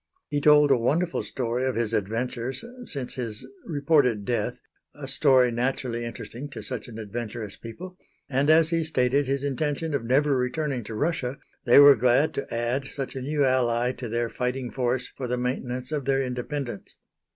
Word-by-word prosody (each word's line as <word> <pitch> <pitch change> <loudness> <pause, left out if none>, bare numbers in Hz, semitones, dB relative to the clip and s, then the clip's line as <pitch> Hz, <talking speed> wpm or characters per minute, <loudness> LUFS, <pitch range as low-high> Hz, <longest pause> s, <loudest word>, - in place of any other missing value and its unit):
He 145 0 -1
told 150 -1 +6
a 135 - +6
wonderful 165 +9 +1
story 125 0 -2
of 130 - -1
his 115 -1 -1
adventures 120 - -2 0.2
since 135 - -5
his 115 -5 -5 0.2
reported 140 - +2
death 120 +1 -1 0.4
a 145 -2 -7
story 130 -2 +4
naturally 120 -1 -2
interesting 120 +4 -7
to - - -8
such 125 -4 -5
an 115 -2 -9
adventurous 110 -1 -5
people; 180 +11 -10 0.3
and 140 +2 +1
as 160 0 +6
he 165 -1 +1
stated 140 -2 +1
his 135 0 -1
intention 145 +3 -1
of 140 - -1
never 140 +4 +3
returning 130 0 -1
to 110 - -6
Russia, 140 -1 -1 0.3
they 120 - +6
were 145 0 +10
glad 125 +5 +3
to 140 - -5
add 120 +4 -1
such 135 0 -5
a 130 - -4
new 145 +2 +1
ally 125 -2 +2
to 125 -2 -7
their 120 +1 0
fighting 125 +1 -3
force 125 -1 0
for 130 - -4
the 125 +1 -1
maintenance 125 +1 -3
of 145 -4 -2
their 135 0 +2
independence. 125 -2 -5
130 Hz, 175 wpm, -26 LUFS, 120-145 Hz, 0.4 s, were